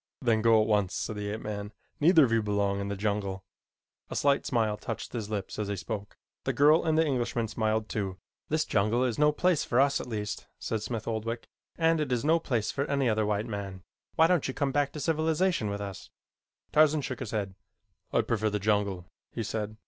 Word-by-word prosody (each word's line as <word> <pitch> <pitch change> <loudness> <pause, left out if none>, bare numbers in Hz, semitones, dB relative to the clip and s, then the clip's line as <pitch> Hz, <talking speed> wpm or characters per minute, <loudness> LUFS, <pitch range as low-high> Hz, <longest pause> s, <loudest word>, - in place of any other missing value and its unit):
"Then 115 -4 +2
go 115 0 +5
at 110 - +2
once," 105 -3 +1
said 110 - -3
the 105 0 -4
ape 110 +2 -4
man. 105 0 -5 0.3
"Neither 160 +1 +6
of 115 - -3
you 115 -1 +3
belong 100 -1 0
in 100 - -3
the 100 - -2
jungle." 100 -2 -2 0.7
A - - -5
slight 140 -1 +2
smile 110 -4 +1
touched 105 - -6
his 110 -4 -4
lips 105 -1 -4
as 105 - -1
he 100 - -2
spoke. 100 +2 -6 0.3
The - - -1
girl 150 +3 +5
and 160 -1 +1
the 160 - +4
Englishman 120 -4 -1
smiled 110 0 -1
too. 95 -4 -3 0.3
"This 155 +1 +1
jungle 110 +4 +2
is 125 -1 -1
no 150 0 +5
place 175 +1 +2
for 120 - +1
us 140 +1 +3
at - - -8
least," 105 -3 -4
said 110 - -3
Smith 110 0 -4
Oldwick, 115 +1 -3 0.3
"and 165 -1 +3
it 145 -4 -2
is 125 +2 0
no 165 +2 +4
place 120 -9 -1
for 140 - -1
any 140 -2 +1
other 110 -2 +1
white 105 0 0
man. 100 -4 -6 0.3
Why 160 - +6
don't 175 -3 +2
you 130 - -4
come 140 -1 0
back 145 0 +1
to 150 - -6
civilization 160 - +1
with 100 0 -3
us?" 100 -1 -7 0.6
Tarzan 155 0 +4
shook 130 -3 -4
his - - -5
head. 100 -3 -2 0.6
"I - - +3
prefer 110 -2 0
the 105 - -1
jungle," 100 -3 0 0.3
he 115 - -3
said. 110 0 -4
110 Hz, 215 wpm, -29 LUFS, 105-140 Hz, 0.7 s, Neither